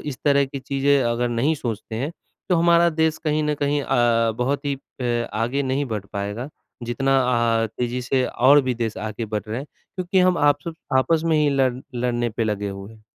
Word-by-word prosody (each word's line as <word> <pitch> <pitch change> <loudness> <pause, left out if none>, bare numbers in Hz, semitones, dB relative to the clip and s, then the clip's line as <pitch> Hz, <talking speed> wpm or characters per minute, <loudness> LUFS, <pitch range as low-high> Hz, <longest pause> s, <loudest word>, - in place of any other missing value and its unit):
इस 140 -4 -6
तरह 140 -1 +4
की 135 +1 -6
चीज़ें 140 +1 +2
अगर 120 0 0
नहीं 120 +7 +1
सोचते 115 -5 -5
हैं, 140 +7 -2 0.4
तो 180 - +3
हमारा 170 0 +5
देश 160 0 +1
कहीं 155 0 +1
न 150 0 0
कहीं 145 +1 +1
अ, 120 -3 +2
बहुत 135 +4 -1
ही 140 -1 0 0.3
अ, 120 -1 -1
आगे 120 +6 0
नहीं 135 +2 0
बढ़ 105 -2 -4
पाएगा। 105 +6 -4 0.3
जितना 135 +3 +1 0.5
अ, - - 0
तेज़ी 125 +1 -2
से 130 +1 +1
और 140 +4 +5
भी 130 -1 -1
देश 115 -2 -3
आगे 110 +1 -4
बढ़ 105 -1 -3
रहे 110 - -3
हैं 135 - -6 0.3
क्योंकि 185 +1 0
हम 180 -1 +3
आपस 145 +3 +2 0.3
आपस 160 +5 +2
में 160 -1 +2
ही 150 -1 +3
लड़ 135 -2 +2 0.2
लड़ने 120 -1 0
पे 115 +1 -2
लगे 105 -2 -2
हुए 100 +2 -8
हैं। 110 -1 -19
130 Hz, 205 wpm, -22 LUFS, 115-145 Hz, 0.5 s, हमारा